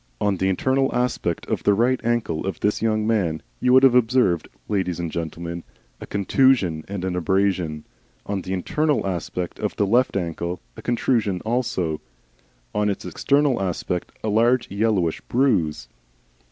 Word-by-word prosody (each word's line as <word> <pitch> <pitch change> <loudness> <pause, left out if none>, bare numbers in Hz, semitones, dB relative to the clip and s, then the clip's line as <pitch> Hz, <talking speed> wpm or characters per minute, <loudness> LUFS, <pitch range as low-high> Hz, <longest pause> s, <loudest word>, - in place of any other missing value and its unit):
On 100 -2 +1
the 95 +2 +1
internal 130 +8 +1
aspect 120 -8 -1
of - - -2
the 100 - +3
right 125 +4 +2
ankle 115 -8 -1
of 95 - -3
this 105 - +1
young 110 -1 +1
man 95 -8 0 0.2
you 125 - +2
would 130 +1 +7
have 135 -2 +7
observed, 120 -8 +3 0.2
ladies 95 -4 -1
and 85 -2 -3
gentlemen, 85 +1 -5 0.4
a - - -9
contusion 100 - +2
and 95 -2 -4
an 90 -1 -2
abrasion; 90 -3 0 0.4
on 100 -2 -2
the 90 - -7
internal 150 - 0
aspect 90 -1 -4
of - - -2
the 100 - +1
left 120 +3 +2
ankle 85 0 -3 0.2
a - - -9
contusion 115 -5 0
also; 105 -9 -1 0.7
on 105 0 +1
its 100 - -3
external 140 -5 +1
aspect 90 -1 -2
a 110 - 0
large 115 +3 +2
yellowish 100 -5 +1
bruise. 85 - +1
100 Hz, 155 wpm, -23 LUFS, 90-120 Hz, 0.7 s, would